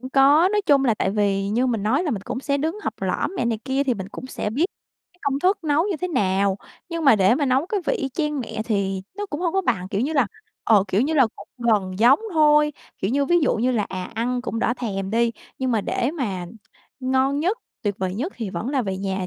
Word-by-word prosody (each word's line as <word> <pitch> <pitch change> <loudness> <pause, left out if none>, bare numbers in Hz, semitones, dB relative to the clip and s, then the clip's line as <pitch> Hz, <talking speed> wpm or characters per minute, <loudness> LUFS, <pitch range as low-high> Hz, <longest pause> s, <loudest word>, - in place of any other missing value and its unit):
cũng 255 +1 -8
có. 285 +6 +5
Nói 420 - +3
chung 280 -2 +4
là 235 -4 +3
tại 190 - 0
vì 200 -1 0
như 235 +5 +1
mình 230 -5 -1
nói 250 - +2
là 330 - -1
mình 200 -6 -3
cũng 255 +4 -4
sẽ 280 0 0
đứng 320 +7 -2
học - - -2
lỏm - - -1
mẹ - - 0
này 230 -2 0
kia 270 +1 0
thì 255 -3 +1
mình 190 -2 -6
cũng 255 - -8
sẽ 210 - -4
biết 275 +10 +1 0.5
cái 360 - -30
công 275 -1 0
thức 375 +2 +1
nấu 300 +2 +2
như 370 - -1
thế 365 +4 -3
nào. 195 - +1 0.3
Nhưng 335 -2 -3
mà 250 -5 +7
để 195 +3 +4
mà 285 +2 0
nấu 265 +4 +2
cái 405 +2 -1
vị - - +2
y 270 - -2
chang 300 +1 -2
mẹ 220 -2 -4
thì 195 -4 -1
nó 410 0 -3
cũng 300 -4 -5
hông 345 -2 0
có 385 - +2
bằng, 200 - -1
kiểu 195 - -1
như 280 +6 0
là, 275 -6 +3 0.4
ờ, 210 -4 +5
kiểu 190 +2 +2
như 295 +6 +1
là, 270 -5 +5
cũng - - -12
gần 205 -6 +1
giống 240 +5 +6 0.2
thôi, 300 -1 +5 0.3
kiểu 195 - -1
như, 280 +3 +2
ví 345 +5 +3
dụ 285 - +2
như 245 +4 +1
là, 235 -4 +1
à, 185 -1 -5
ăn 245 +3 -1
cũng 230 - -3
đỡ 235 - +1
thèm 195 -5 -3
đi, 230 +1 +2 0.3
nhưng 260 -1 -1
mà 225 -3 +2
để 240 +5 -1
mà 205 - -3 0.5
ngon 265 +2 +1
nhất, 375 +9 0 0.2
tuyệt 205 -2 0
vời 185 -1 -2
nhất 280 - -3
thì 225 -5 -4
vẫn 180 +7 -4
là 270 -2 +1
về 195 -3 -3
nhà 190 -1 -2
250 Hz, 265 wpm, -23 LUFS, 205-295 Hz, 0.5 s, mà